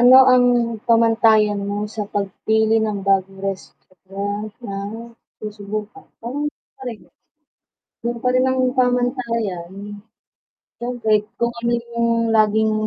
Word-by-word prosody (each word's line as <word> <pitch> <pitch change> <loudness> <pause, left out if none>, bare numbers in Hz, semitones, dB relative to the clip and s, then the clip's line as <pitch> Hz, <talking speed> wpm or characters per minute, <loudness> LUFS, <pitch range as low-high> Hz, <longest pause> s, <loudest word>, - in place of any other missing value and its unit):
Ano 250 +2 +9
ang 250 -1 +5 0.4
pamantayan 225 -3 +4
mo 205 0 -2 0.2
sa 215 - -2
pagpili 220 +3 +1
ng 210 -2 -1
bagong 195 0 +1
restaurant 200 +2 -6
na 200 -5 -6 0.6
susubukan? 210 - -6 2.0
Yun 235 0 -2
pa 250 - +1
rin 255 - +4
ang 260 0 +1 0.2
pamantayan, 245 -8 0 1.1
siyempre 240 -2 -2 0.3
kung 235 - +3
ano 235 0 0 0.2
yung 235 0 0 0.2
laging 220 0 +3
220 Hz, 100 wpm, -21 LUFS, 205-235 Hz, 2.0 s, Ano